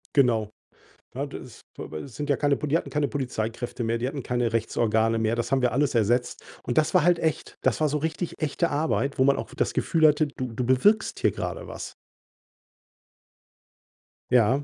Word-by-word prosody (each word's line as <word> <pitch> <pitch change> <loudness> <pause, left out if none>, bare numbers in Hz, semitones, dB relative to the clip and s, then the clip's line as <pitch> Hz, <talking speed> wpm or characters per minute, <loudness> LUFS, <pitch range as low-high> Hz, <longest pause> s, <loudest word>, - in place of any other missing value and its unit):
Genau. 115 -6 +3 0.7
Na, - - -2
das - - -10 0.2
aber 80 - -6
es 130 -5 -10
sind 145 +4 -4
ja 140 - +3
keine 145 -2 +2
Poli 150 - -4
die 165 - +5
hatten - - -6
keine 150 -1 +1
Polizeikräfte 120 -3 -3
mehr, 115 +1 0
die 120 +2 -2
hatten 140 0 -4
keine 120 -2 -1
Rechtsorgane 115 0 +1
mehr, 110 +1 +1
das 120 +2 -3
haben 135 -1 +2
wir 125 - +3
alles 140 -1 +1
ersetzt. 120 +3 +1 0.2
Und 120 - -3
das 155 0 +3
war - - +5
halt 175 -1 +4
echt. 160 -2 -2
Das - - +1
war 155 - +3
so 150 - 0
richtig 160 +3 -3
echte 160 +3 0
Arbeit, 145 -2 0
wo 130 - +4
man 140 0 +4
auch - - -5
das - - 0
Gefühl 160 -1 +2
hatte, 150 0 +3
du 130 -4 -6
du 125 - -2
bewirkst 130 - +3
hier - - +3
grade - - -5
was. - - -7 2.4
Ja, 125 +3 +4
130 Hz, 195 wpm, -26 LUFS, 115-150 Hz, 2.4 s, die